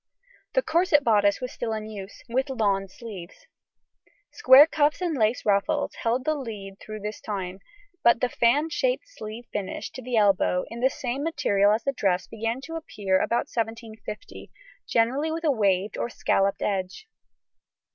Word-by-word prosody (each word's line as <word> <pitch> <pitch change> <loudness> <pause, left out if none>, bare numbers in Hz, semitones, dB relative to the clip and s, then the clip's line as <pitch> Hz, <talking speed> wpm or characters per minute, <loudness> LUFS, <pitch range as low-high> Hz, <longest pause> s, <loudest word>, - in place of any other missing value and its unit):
The - - +2
corset 320 -3 +3
bodice 205 -4 +3
was 250 - -4
still 230 -2 -3
in 215 -1 -4
use, 205 -2 -9
with 260 +4 -1
lawn 200 -6 0
sleeves: 200 - -10 0.9
square 285 -8 +8
cuffs 300 -2 +1
and 350 -4 -1
lace 225 -1 +1
ruffles 200 -1 +1
held 245 +3 -1
the 310 - +2
lead 210 -8 -7
throughout 215 -1 -8
this 210 0 -5
time, 190 -3 -4 0.4
but 235 -1 +5
the 250 - +2
fan 275 +7 +2
shaped - - 0
sleeve 230 - -9
finish 200 -2 -4
to 260 - -8
the 250 -1 -2
elbow, 195 -3 +3
in 230 - -6
the 260 +2 +3
same 260 0 -4
material 205 -10 +2
as 215 +2 +1
the 275 - 0
dress, 190 -6 0
began 225 +3 -3
to 325 +3 -6
appear 195 -11 -1
about 235 - 0
1750, 225 - -5 0.4
generally 260 +7 +1
with 330 +1 -4
a 310 - +3
waved 200 -4 +1
or - - -1
scalloped 195 -3 0
edge. 195 - -2
230 Hz, 165 wpm, -26 LUFS, 205-275 Hz, 0.9 s, square